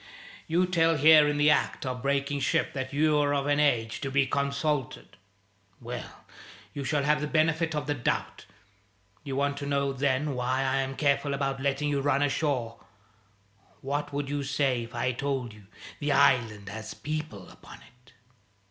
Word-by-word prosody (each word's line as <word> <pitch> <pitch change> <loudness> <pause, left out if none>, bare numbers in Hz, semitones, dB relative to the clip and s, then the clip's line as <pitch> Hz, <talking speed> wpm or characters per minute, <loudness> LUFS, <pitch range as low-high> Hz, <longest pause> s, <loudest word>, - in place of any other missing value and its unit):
You 175 +3 +2
tell 165 -3 +2
here 155 +1 +7
in 150 0 0
the 145 +1 +5
act 150 - 0
of 125 -1 -4
breaking 140 +1 0
ship, - - 0
that 130 -1 -4
you're 145 -1 +2
of 140 -1 -1
an 145 0 +1
age 115 -6 +1
to 135 - -3
be 140 0 +2
consulted. 140 +1 -2 0.6
Well, 120 0 -8 0.5
you 140 - -5
shall 145 +1 0
have 150 +1 +2
the 150 - -2
benefit 160 +1 +1
of 150 -1 -2
the 145 - 0
doubt. 125 -4 -3 0.8
You 140 -3 -5
want 140 +1 0
to 140 0 -5
know, 140 -1 0
then, 140 +2 0
why 130 +1 -1
I'm 135 0 -1
careful 140 -1 +1
about 135 -1 -2
letting 140 +1 0
you 140 -1 0
run 140 0 +2
ashore? 135 -5 -1 1.0
What 145 +2 -3
would 145 0 -3
you 145 +1 -2
say 135 -3 0
if 120 +2 -13
I 125 +2 0
told 130 -2 -3
you 105 -2 -17 0.3
the 145 0 0
island 115 -8 +2
has 110 +1 -7
people 155 - -5
upon - - -14
it?" 125 -1 -23
140 Hz, 170 wpm, -28 LUFS, 130-150 Hz, 1.0 s, here